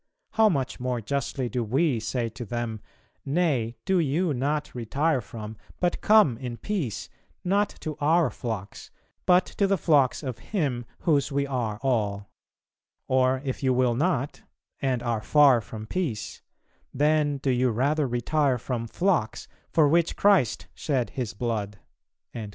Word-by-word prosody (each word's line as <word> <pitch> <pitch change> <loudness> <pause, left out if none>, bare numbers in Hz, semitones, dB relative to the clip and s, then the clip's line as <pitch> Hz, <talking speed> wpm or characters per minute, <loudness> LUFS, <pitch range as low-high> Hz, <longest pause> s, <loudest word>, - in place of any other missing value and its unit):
How 220 -1 +4
much 135 -8 -2
more 125 -1 -1
justly 130 +2 -2
do 120 +1 -2
we 130 +3 +1
say 115 +2 -2
to 120 +3 -8
them, 120 -1 -4 0.4
'Nay, 135 -7 0
do 190 -2 +2
you, 160 +2 +1
not 145 +4 -1
retire 135 +5 0
from, 110 -1 -8 0.2
but 175 -1 0
come 205 - +5
in 125 -3 -5
peace, 170 - -3 0.4
not 200 +3 +2
to 155 -1 -4
our 155 -2 +3
flocks, 105 -4 -6 0.4
but 180 0 +5
to 200 - 0
the 195 0 +2
flocks 145 -5 +2
of 125 -4 -4
Him 135 - -2 0.2
whose 150 -4 +2
we 140 0 +1
are 120 -6 -2
all; 105 -6 -1 0.8
or 130 0 +2
if 130 - -3
you 130 -2 +2
will 125 -1 +3
not, 145 0 -1 0.4
and 130 -3 0
are 115 -3 -1
far 140 -1 +5
from 110 0 -8
peace, 130 -7 -3 0.5
then 150 0 +2
do 135 -1 0
you 125 0 +2
rather 140 +6 +1
retire 130 +3 +1
from 120 -1 -4
flocks, 170 - 0 0.2
for 155 -3 +4
which 170 +3 +2
Christ 195 - +3
shed 130 -5 -1
His 120 -6 -4
Blood.'" 105 -3 -2
130 Hz, 150 wpm, -26 LUFS, 120-155 Hz, 0.8 s, come